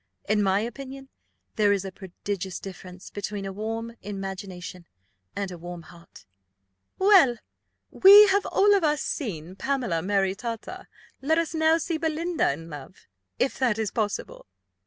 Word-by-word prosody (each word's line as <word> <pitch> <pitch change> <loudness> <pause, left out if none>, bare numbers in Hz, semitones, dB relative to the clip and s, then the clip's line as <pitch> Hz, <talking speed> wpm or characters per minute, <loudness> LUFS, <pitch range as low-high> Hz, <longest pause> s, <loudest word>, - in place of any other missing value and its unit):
In 210 0 +2
my 195 0 +2
opinion 270 +3 -7 0.5
there 205 -2 +4
is 195 -1 0
a 190 - -5
prodigious 190 0 -6
difference 185 -1 -10
between 205 0 -5
a 195 - -5
warm 225 +3 -4
imagination 190 -3 -7 0.5
and 200 -2 -3
a 175 - -8
warm 175 0 -8
heart." 170 +1 -16 0.7
"Well," 380 - +1
said 375 -9 +8
Lady - - -1
Delacour, 235 - -18
"we 415 +1 +11
have 400 +1 +2
all 410 +1 +4
of 395 -3 +2
us 300 -2 +1
seen 185 - -4
Pamela 245 -9 -1
maritata 200 +4 -2 0.3
let 315 +4 +2
us 335 -1 -1
now 320 0 +3
see 330 0 -2
Belinda 325 - 0
in 165 +4 -7
love, 150 +2 -11 0.3
if 265 - -1
that 245 -5 +2
be 220 - 0
possible. 210 - -3
210 Hz, 155 wpm, -26 LUFS, 190-275 Hz, 0.7 s, we